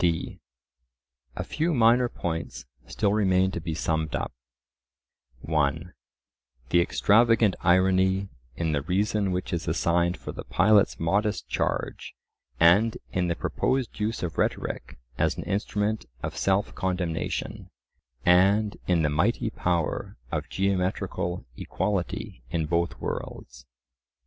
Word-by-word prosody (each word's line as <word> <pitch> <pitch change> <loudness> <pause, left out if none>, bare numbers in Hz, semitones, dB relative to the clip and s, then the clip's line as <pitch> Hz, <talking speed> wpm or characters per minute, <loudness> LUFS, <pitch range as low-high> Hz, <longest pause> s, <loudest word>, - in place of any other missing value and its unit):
d. 85 -2 0 1.0
A - - -3
few 160 +1 -1
minor 120 +1 +4
points 80 -6 -4 0.2
still - - 0
remain 95 -3 +3
to 85 - -4
be 80 -1 -3
summed 80 -1 -1
up: - - -2 1.1
(1) 80 +3 0 0.8
The 85 - +4
extravagant 110 +2 +4
irony 95 +2 +3 0.3
in 80 +1 -1
the 70 -2 0
reason 100 +5 0
which 90 0 -3
is 85 -1 -2
assigned 85 +2 +1
for - - -7
the - - -7
pilot's 100 +2 +3
modest 100 +6 0
charge; - - -2 0.4
and 100 +7 +5
in 90 -1 0
the 85 - 0
proposed 130 +4 -1
use 110 0 -2
of 85 - -3
rhetoric - - -2 0.2
as - - +1
an - - -4
instrument 105 - -1 0.2
of - - -3
self 95 +1 +1
condemnation; 90 -4 -3 0.6
and 100 +4 +4
in 85 -3 +3
the 75 - +2
mighty 80 +2 +1
power 85 -3 -1
of - - -3
geometrical 95 -2 -1
equality 105 - -3
in 80 0 -1
both 85 +2 -1
worlds. 60 0 -6
90 Hz, 125 wpm, -26 LUFS, 85-105 Hz, 1.1 s, and